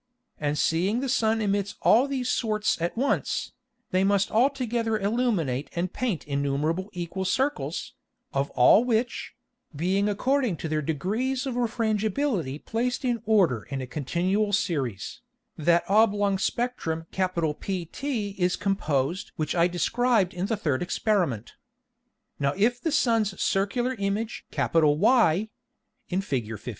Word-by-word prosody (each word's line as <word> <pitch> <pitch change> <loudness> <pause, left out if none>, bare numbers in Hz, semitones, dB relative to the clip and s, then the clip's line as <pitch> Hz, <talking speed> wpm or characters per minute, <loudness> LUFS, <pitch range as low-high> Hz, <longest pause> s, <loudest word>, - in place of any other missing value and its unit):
And 150 0 -1
seeing 185 +10 +1
the 270 - -2
Sun 225 -3 +1
emits 200 -1 -1
all 245 +6 +5
these 265 -3 -2
sorts 215 -7 0
at 170 +6 -2
once, 275 +3 0 0.4
they 185 +1 +2
must 200 0 +2
all 240 +5 +4
together 235 -5 -1
illuminate 200 - 0
and 175 +1 -2
paint 230 -10 -2
innumerable 145 +6 -1
equal 175 +1 -4
Circles, 265 +10 -1 0.4
of 140 +1 0
all 160 - +6
which, 245 0 -1 0.4
being 190 +7 +1
according 250 -1 +1
to 160 - -4
their 155 0 0
degrees 215 - -1
of 265 - -2
Refrangibility 220 - 0
placed 245 +4 -1
in 240 -3 0
order 185 - +3
in 135 -2 -3
a 130 - -4
continual 180 +10 -1
Series, 135 - -2 0.3
that 170 +2 +2
oblong 205 -1 +3
Spectrum 190 -9 -2
PT 180 - -2 0.4
is 180 0 +2
composed 185 -3 -1
which 155 -2 -2
I 170 0 +4
described 215 +2 +1
in 180 +2 -2
the 225 -1 -1
third 145 -9 -1
Experiment. 175 - 0 0.9
Now 140 0 0
if 240 +4 +2
the 325 - -1
Sun's 225 -8 +1
circular 240 +6 0
Image 200 +3 -2
Y 165 - +3 0.6
[in 185 +1 0
Fig. 135 - -2
15. 110 -3 -6
195 Hz, 135 wpm, -26 LUFS, 165-230 Hz, 0.9 s, all